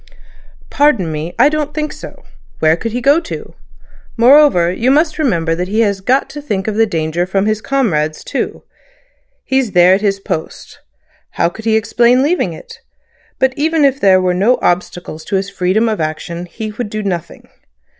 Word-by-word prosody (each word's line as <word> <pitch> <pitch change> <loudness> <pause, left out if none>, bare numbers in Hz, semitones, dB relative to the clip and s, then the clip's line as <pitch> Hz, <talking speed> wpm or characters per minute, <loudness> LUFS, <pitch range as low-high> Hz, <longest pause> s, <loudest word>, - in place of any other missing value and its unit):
"Pardon 255 - +2
me. 155 +3 -5
I 250 +4 +5
don't 300 -1 -2
think 305 -1 -3
so. - - -11 0.3
Where 155 0 +3
could 225 +7 -5
he 245 +2 -3
go 285 +5 +4
to? 335 - -8 0.6
Moreover, 235 - +5
you 235 +7 0
must 310 +3 +2
remember 170 - 0
that 180 +2 -3
he 215 +4 0
has 200 -3 0
got 260 +7 +1
to 295 - -7
think 205 -9 -3
of 215 - -1
the 225 +1 +2
danger 165 -1 -2
from 195 +1 0
his 215 0 -1
comrades 165 - -1
too. - - -4 0.8
He's 265 -6 -1
there 180 0 +6
at 195 - +1
his 200 -2 0
post. 160 -4 -6 0.5
How - - +1
could 220 +5 -12
he 220 -1 +2
explain 235 +4 +2
leaving 340 +6 0
it? 475 -2 -12 0.6
But 265 0 +1
even 315 0 +1
if 275 0 +1
there 190 -1 +5
were 185 -1 +1
no 205 +8 +2
obstacles 175 -2 -2
to 200 - -2
his 195 +1 -2
freedom 190 +6 +1
of 215 -6 -1
action 170 +3 -4
he 215 +4 -6
would 210 0 -5
do 215 0 -4
nothing. 175 -5 -5
215 Hz, 185 wpm, -15 LUFS, 180-265 Hz, 0.8 s, there